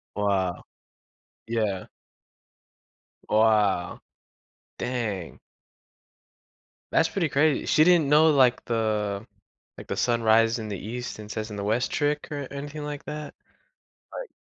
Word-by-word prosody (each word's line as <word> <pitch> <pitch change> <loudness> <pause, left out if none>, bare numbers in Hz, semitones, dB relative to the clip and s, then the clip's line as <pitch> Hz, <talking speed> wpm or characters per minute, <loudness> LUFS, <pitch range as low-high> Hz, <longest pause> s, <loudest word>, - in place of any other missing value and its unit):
Wow. 95 -3 0 0.8
Yeah. 110 -5 -1 1.4
Wow. 105 -5 +2 0.8
Dang. 110 -8 -3 1.5
That's - - +3
pretty 175 -6 -1
crazy. 145 +1 +2
She 155 - +5
didn't 170 -5 +4
know, 155 +2 +6
like, 130 -4 +3
the 110 -2 -1 0.5
like, - - -9
the - - -2
sun 120 -1 +1
rises 115 +1 +4
in 110 -1 -5
the 100 -3 -4
east 120 +2 -6
and 105 0 -10
sets 110 0 -4
in 105 - -6
the 100 - -4
west 115 +4 0
trick 145 0 -1
or 145 -2 -4
anything 145 +2 -6
like 145 -1 -6
that, 150 0 -6 0.8
like - - -7
115 Hz, 125 wpm, -26 LUFS, 105-145 Hz, 1.5 s, know